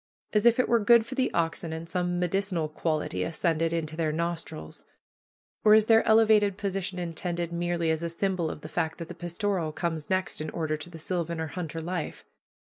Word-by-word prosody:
As 210 +2 +4
if 235 +1 +5
it 255 - +3
were 235 - +4
good 225 +1 +5
for 250 - -7
the 260 -1 +1
oxen, 165 0 -1
and 160 +1 -5
some 175 0 -1
medicinal 180 -2 0
quality 155 - -2
ascended 165 - 0
into 160 -2 -2
their 160 -2 0
nostrils. 165 -1 -4 0.8
Or 215 0 +8
is 215 -1 +5
their 225 0 +6
elevated 215 -3 +5
position 195 -2 -2
intended 170 0 -3
merely 170 -1 0
as 160 0 -1
a 170 - -2
symbol 175 -1 -1
of 150 - -7
the 155 - -7
fact 160 0 -2
that 170 -2 -7
the - - -5
pastoral 175 0 -2
comes 160 -2 -3
next 185 -4 0
in 155 - -3
order 155 -1 -2
to 155 +3 -8
the 165 - -10
sylvan 170 0 -2
or 160 - -2
hunter 165 -1 -5
life? 170 -1 -4
170 Hz, 200 wpm, -28 LUFS, 160-195 Hz, 0.8 s, Or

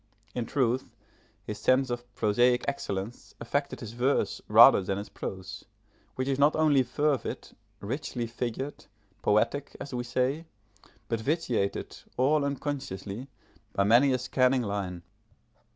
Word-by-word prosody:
In 120 -2 -3
truth, 130 -1 0 0.5
his 105 0 -6
sense 130 +3 +3
of 120 0 -5
prosaic 120 +4 +3
excellence 110 -5 -4
affected 140 +5 -2
his 110 -3 -6
verse 125 +4 0
rather - - +8
than 95 +1 -2
his 100 - -6
prose, 95 -1 -7 0.5
which 130 0 -2
is 135 0 0
not 145 +2 +5
only 155 -3 +4
fervid, 140 +2 -1 0.3
richly 125 +2 -3
figured, 120 +4 -4 0.4
poetic, 120 +7 +1
as 140 - -7
we 120 -1 -2
say, 130 +6 -1 0.6
but 115 - -1
vitiated, 125 - -1 0.2
all 140 +4 +3
unconsciously, 135 -6 -4 0.5
by 100 - +2
many 120 +7 +5
a 130 - +2
scanning 130 0 +2
line. 95 -4 -3
125 Hz, 130 wpm, -28 LUFS, 110-140 Hz, 0.6 s, rather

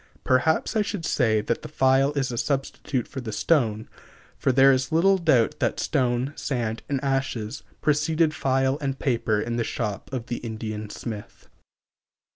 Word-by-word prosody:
Perhaps 145 - +2
I 215 - +3
should 205 -5 -3
say 110 -7 +2
that 115 +2 -2
the - - -7
file 135 +1 +3
is 135 -3 -1
a 120 - -4
substitute 135 -2 -2
for 135 - -6
the 115 -3 -5
stone, 110 -2 +1 0.5
for - - +1
there 135 +1 +6
is 130 -1 0
little 190 +4 +4
doubt 135 -9 +2
that - - 0
stone, 125 +2 0
sand, 115 -4 -2
and 140 -2 0
ashes 135 -5 -2 0.2
preceded 155 +1 +2
file 135 -2 +1
and 135 -1 -2
paper 115 -6 0
in 115 +2 -2
the 120 - +1
shop 105 -2 -4
of 125 -4 -4
the 120 - -3
Indian 110 -2 -5
smith. 105 -1 -8
130 Hz, 165 wpm, -25 LUFS, 115-140 Hz, 0.5 s, there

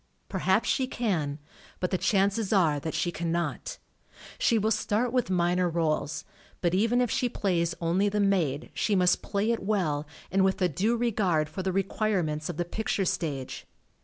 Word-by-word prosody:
Perhaps - - +1
she 260 -2 +1
can, 170 - -1 0.4
but 180 - -1
the 185 - +2
chances 200 +1 +1
are 165 -8 +3
that 160 +2 -4
she 165 +3 0
cannot. 170 +1 -2 0.6
She 230 - +3
will 220 +1 +1
start 230 +3 0
with 250 -5 +1
minor 180 0 +2
rdles, 160 -2 -1 0.4
but 175 -1 0
even 230 +6 +3
if 245 - 0
she 250 - +1
plays 170 -6 0
only 180 +5 +2
the 210 +1 -1
maid 175 -8 +1
she 210 - +1
must 180 -1 +3
play 205 +3 0
it 230 - -1
well 175 -8 0 0.2
and 190 +1 +3
with 190 +1 +2
a 180 - +3
due 210 - 0
regard 195 -10 +1
for 190 - -5
the 190 0 -1
re 195 +1 +1
quirements 180 -7 -1
of 170 - -4
the 175 - -1
picture 200 +1 -1
stage. 145 -7 -3
185 Hz, 180 wpm, -28 LUFS, 165-210 Hz, 0.6 s, are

